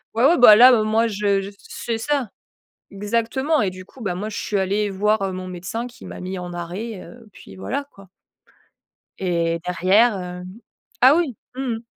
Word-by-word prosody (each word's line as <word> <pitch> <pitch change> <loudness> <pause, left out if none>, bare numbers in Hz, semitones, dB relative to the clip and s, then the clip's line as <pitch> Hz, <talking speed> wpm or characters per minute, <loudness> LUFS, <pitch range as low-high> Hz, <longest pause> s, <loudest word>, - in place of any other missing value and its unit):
Ouais, 230 - +1
ouais 335 +5 +5
bah 215 -4 +9
là, 250 +3 +9
heu, 225 - +3
moi 220 +2 +2
je 200 -2 0
c'est 230 -1 -5
ça, 275 -2 -1 0.6
exactement 230 +8 0
et 195 - 0
du 185 0 -10
coup, 255 - -18
bah, 190 -4 -2
moi 205 +4 -4
je 215 - -7
suis 205 - -2
allée 200 +2 0
voir, 210 +2 +1
heu, 195 - -2
mon 185 0 -6
médecin 185 +7 -5
qui 250 +1 -16
m'a - - -9
mis 185 +1 -5
en 175 0 -7
arrêt, 180 +5 -6
heu, 235 -2 -14
puis 95 - -14
voilà, 95 - -4
quoi 195 -1 -16 1.1
et 170 -2 0
derrière, 195 +6 +3
heu 180 0 -7 0.6
ah 260 +3 +7
oui, 305 - -1 0.2
mmh - - -4 0.2
mh. 225 - -11
205 Hz, 190 wpm, -21 LUFS, 185-230 Hz, 1.1 s, bah